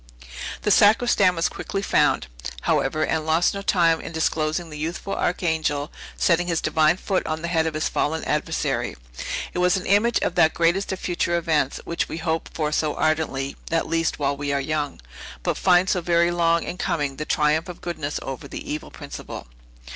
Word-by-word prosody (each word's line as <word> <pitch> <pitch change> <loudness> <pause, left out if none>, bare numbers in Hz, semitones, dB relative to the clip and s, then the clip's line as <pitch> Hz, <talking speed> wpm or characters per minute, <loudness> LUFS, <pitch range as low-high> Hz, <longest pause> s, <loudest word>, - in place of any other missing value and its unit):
The 210 - +2
sacristan 205 -2 +5
was 165 - +1
quickly 195 -1 -4
found, - - +2 0.4
however, 155 +3 +1
and 160 -1 -1
lost 160 +2 +2
no 200 - -4
time 170 -4 +3
in - - -7
disclosing 160 0 -1
the 150 - -7
youthful 170 +5 -3
Archangel, 160 -4 0 0.3
setting 175 0 +2
his 165 -2 +1
divine 160 +1 +3
foot 190 0 -1
on 155 +1 -3
the - - -1
head 165 -2 +1
of 160 - -3
his 155 - 0
fallen 160 +2 -1
adversary. - - -1 0.6
It - - -2
was 180 +1 +3
an 185 - -5
image 220 +4 +3
of - - 0
that 160 - +4
greatest 170 +4 +2
of 190 - -3
future 175 -1 0
events, 155 -5 0
which 170 - -2
we - - -4
hope 160 0 -2
for 150 -2 -2
so 155 -1 0
ardently, 155 -4 0
at 165 0 0
least, 165 0 0
while 140 -1 0
we 145 0 -3
are 140 - +1
young, 145 0 -2 0.4
but - - 0
find 180 0 +4
so 185 -2 +1
very 170 0 +3
long 170 -1 +2
in 180 - -6
coming, 145 -4 -1
the 150 - -3
triumph 155 +3 +1
of 180 - -8
goodness 155 -4 -4
over 135 -1 -6
the - - -7
evil 150 0 -4
principle. - - -8
165 Hz, 190 wpm, -24 LUFS, 155-175 Hz, 0.6 s, sacristan